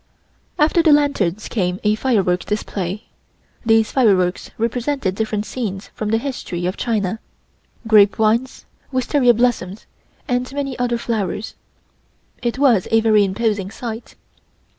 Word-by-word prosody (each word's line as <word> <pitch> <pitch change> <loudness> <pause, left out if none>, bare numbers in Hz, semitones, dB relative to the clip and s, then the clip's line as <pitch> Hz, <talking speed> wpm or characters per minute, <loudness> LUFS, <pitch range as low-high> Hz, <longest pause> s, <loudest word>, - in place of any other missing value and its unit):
After 315 +3 +3
the 325 -2 +4
lanterns 220 - +1
came 180 -4 -1
a 210 0 +3
firework 195 -7 +1
display. 205 -1 -3 0.6
These 225 -2 +3
fireworks 190 -8 +2
represented 235 -1 -1
different 215 0 -2
scenes 205 -6 -5
in 215 - 0
the 225 - +2
history 225 -9 -4
of 185 +2 -1
China, 220 -3 -1 0.7
grape 210 -3 +5
vines, 225 +4 0 0.3
wisteria 255 -1 +3
blossoms, 220 -5 -1 0.4
and 250 +1 -1
many 275 -2 -3
other 240 -1 0
flowers. 220 -3 -3 0.9
It 240 0 -2
was 250 -9 +3
a 225 0 +4
very 215 -2 +4
imposing 200 0 -1
sight. 225 +1 -7
220 Hz, 125 wpm, -20 LUFS, 200-245 Hz, 0.9 s, grape